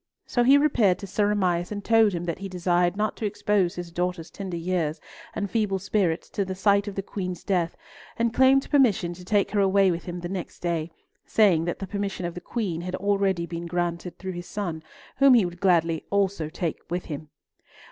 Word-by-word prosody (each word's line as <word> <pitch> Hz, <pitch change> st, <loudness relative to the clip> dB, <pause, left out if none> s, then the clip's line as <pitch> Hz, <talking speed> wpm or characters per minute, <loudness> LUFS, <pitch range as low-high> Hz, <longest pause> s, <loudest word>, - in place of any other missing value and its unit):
So 245 Hz, -, 0 dB
he 270 Hz, +3 st, +7 dB
repaired 240 Hz, -11 st, +3 dB
to -, -, -8 dB
Sir 205 Hz, +2 st, +1 dB
Amias, 180 Hz, -3 st, 0 dB
and 205 Hz, -1 st, -5 dB
told 225 Hz, -3 st, +4 dB
him 170 Hz, -1 st, -3 dB
that 170 Hz, -1 st, -3 dB
he 195 Hz, 0 st, -5 dB
desired 175 Hz, 0 st, +1 dB
not 215 Hz, 0 st, 0 dB
to 220 Hz, -, -3 dB
expose 205 Hz, -3 st, 0 dB
his 175 Hz, -1 st, -6 dB
daughter's 180 Hz, -1 st, -3 dB
tender 190 Hz, -3 st, -5 dB
years 165 Hz, -3 st, -1 dB, 0.4 s
and 200 Hz, -, -1 dB
feeble 200 Hz, -1 st, 0 dB
spirits 185 Hz, -3 st, 0 dB
to 200 Hz, -, -1 dB
the 190 Hz, -1 st, -5 dB
sight 200 Hz, +2 st, +2 dB
of 200 Hz, -, -5 dB
the 195 Hz, -, -3 dB
Queen's 185 Hz, -3 st, -5 dB
death, 175 Hz, -4 st, 0 dB, 0.4 s
and 230 Hz, 0 st, +1 dB
claimed 265 Hz, +2 st, +4 dB
permission 225 Hz, -, +3 dB
to 180 Hz, +1 st, -12 dB
take 205 Hz, +2 st, +1 dB
her 205 Hz, -, +1 dB
away 195 Hz, -1 st, +4 dB
with 170 Hz, 0 st, -4 dB
him 175 Hz, -1 st, -5 dB
the 175 Hz, -, -4 dB
next 180 Hz, -2 st, -5 dB
day, 170 Hz, -2 st, -2 dB, 0.4 s
saying 185 Hz, -7 st, +4 dB
that 175 Hz, -, -2 dB
the 195 Hz, -, -5 dB
permission 200 Hz, -2 st, -3 dB
of 170 Hz, -, -3 dB
the 180 Hz, -, -7 dB
Queen 190 Hz, -9 st, -3 dB
had 180 Hz, +1 st, -4 dB
already 195 Hz, -3 st, +1 dB
been 170 Hz, 0 st, -6 dB
granted 175 Hz, 0 st, -3 dB
through 190 Hz, 0 st, -5 dB
his 175 Hz, -1 st, -7 dB
son, 175 Hz, -6 st, -4 dB, 0.4 s
whom 275 Hz, -2 st, +7 dB
he 225 Hz, -6 st, +5 dB
would 175 Hz, 0 st, -6 dB
gladly 165 Hz, -4 st, +2 dB
also 195 Hz, -5 st, 0 dB
take 170 Hz, -1 st, -3 dB
with 175 Hz, +1 st, -3 dB
him. 155 Hz, -1 st, -7 dB
185 Hz, 210 wpm, -25 LUFS, 175-205 Hz, 0.4 s, he